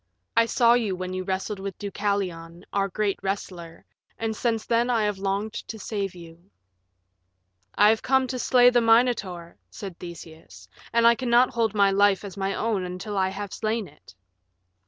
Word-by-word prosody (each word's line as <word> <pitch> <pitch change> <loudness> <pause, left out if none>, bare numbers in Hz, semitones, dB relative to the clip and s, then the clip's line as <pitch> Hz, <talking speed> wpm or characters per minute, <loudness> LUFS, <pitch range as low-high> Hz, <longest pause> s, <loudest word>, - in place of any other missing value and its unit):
I 230 0 +4
saw 235 -1 +4
you 225 -6 +1
when 185 0 -5
you 185 0 -3
wrestled 190 +2 -3
with 195 -1 -6
Deucalion, 185 -4 -3
our 200 -1 +1
great 200 +1 -1
wrestler, 180 -4 -5 0.3
and 225 -1 -2
since 225 -1 -1
then 235 +1 +1
I 230 -3 +2
have 210 -2 -1
longed 200 +2 -2
to 225 - -7
save 200 -2 -4
you." 170 +1 -14 1.3
"I 210 - +6
have 220 0 +2
come 265 0 +2
to 255 - -3
slay 245 0 +5
the 245 -1 +3
Minotaur," 225 -7 +1
said 180 - -9
Theseus, 160 - -11 0.2
"and 235 0 +3
I 235 - +8
cannot 245 0 +3
hold 225 -3 0
my 200 -1 +4
life 200 0 +3
as 200 - -8
my 195 0 -2
own 215 -4 -1
until 185 +3 -5
I 190 -1 +1
have 200 +1 -6
slain 220 -1 -2
it." 150 -8 -19
200 Hz, 175 wpm, -25 LUFS, 185-225 Hz, 1.3 s, I